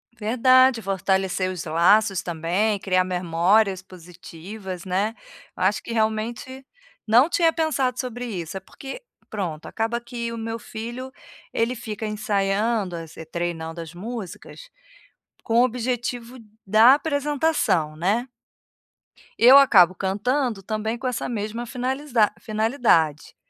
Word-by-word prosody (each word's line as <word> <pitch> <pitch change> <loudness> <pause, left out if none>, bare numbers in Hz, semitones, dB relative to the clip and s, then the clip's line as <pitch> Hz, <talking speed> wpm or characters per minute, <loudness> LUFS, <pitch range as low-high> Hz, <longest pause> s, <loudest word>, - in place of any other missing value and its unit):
Verdade, 255 +2 +4
fortalecer 190 -1 0
os 175 -2 -6
laços 185 +5 +3
também, 180 +5 -1
criar 185 -1 +1
memórias 185 +3 +1
positivas, 180 +1 -10
né. 195 +4 0 0.4
Eu 185 - -3
acho 200 +3 +1
que, - - -7
realmente, 230 +4 -2 0.4
não 245 +9 +5
tinha 335 -2 +3
pensado 270 -6 0
sobre 245 -1 -4
isso, 185 -5 -5
é - - -4
porque 270 - -10 0.3
pronto, 175 -7 -4
acaba 225 +1 -2
que 235 -1 -5
o 230 - -6
meu 225 0 -4
filho, 240 +4 -7 0.4
ele 235 +2 0
fica 220 -1 -6
ensaiando, 205 -1 -1
es 165 -1 -9
eh, 160 - -8
treinando 170 0 -4
as 165 0 -9
músicas, 225 - -8 0.7
com 230 +1 +2
o - - +5
objetivo 245 0 -3 0.3
da 220 +6 +7
apresentação. 285 - 0
né. 210 +9 0 1.1
Eu 250 +4 +8
acabo 185 -10 +6
cantando, 210 +3 -1
também, 220 +2 -3
com 260 - -9
essa 250 - -3
mesma 225 +1 -4
finalisdade 250 -2 0
finalidade, 215 - +1
220 Hz, 125 wpm, -23 LUFS, 185-245 Hz, 1.1 s, Eu